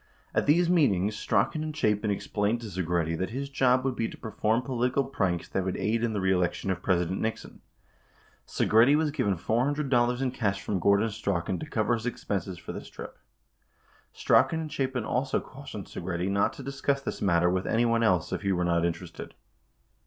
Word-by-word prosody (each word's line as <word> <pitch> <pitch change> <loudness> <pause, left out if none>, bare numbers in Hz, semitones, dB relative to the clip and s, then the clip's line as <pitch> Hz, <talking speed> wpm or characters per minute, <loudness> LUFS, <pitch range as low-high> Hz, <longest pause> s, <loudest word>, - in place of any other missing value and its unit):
At - - +1
these 170 +4 +4
meetings, 105 - +2
Strachan 130 +10 0
and 155 0 -5
Chapin 105 -6 +1
explained 105 +3 -1
to 115 - -6
Segretti 85 -2 -1
that 95 - -1
his 140 +4 -4
job 130 -1 +2
would 130 -2 0
be 115 - -1
to - - -10
perform 110 +2 -1
political 125 +1 0
pranks 95 -10 -1
that 95 - -1
would 95 0 -2
aid 115 +2 0
in 115 -2 0
the 105 - -1
reelection 95 0 +1
of 95 -1 -3
President 90 -1 0
Nixon. 110 0 -4 0.9
6 - - -1
Segretti 120 +7 +6
was 155 -1 +1
given 100 -9 0
$400 125 - +1
in 130 -2 0
cash 100 -6 -1
from 100 -1 -2
Gordon 100 +5 +3
Strachan 95 -4 -2
to 155 - -6
cover 110 +2 +1
his 115 0 -2
expenses 95 -6 -3
for - - -8
this - - -8
trip. - - -10 0.9
Strachan 160 0 +3
and 155 -1 -6
Chapin 130 -5 -1
also 130 +4 0
cautioned 130 -7 -9
Segretti 90 +1 -3
not 100 0 +2
to 140 - -9
discuss 140 +1 -1
this - - -5
matter 90 -2 +3
with 95 0 -1
any 115 +2 +2
one 115 0 +2
else 90 -7 +2
if - - -2
he 100 -1 0
were 90 -1 +1
not 85 -1 +2
interested. 85 -1 -4
110 Hz, 190 wpm, -28 LUFS, 95-130 Hz, 0.9 s, Segretti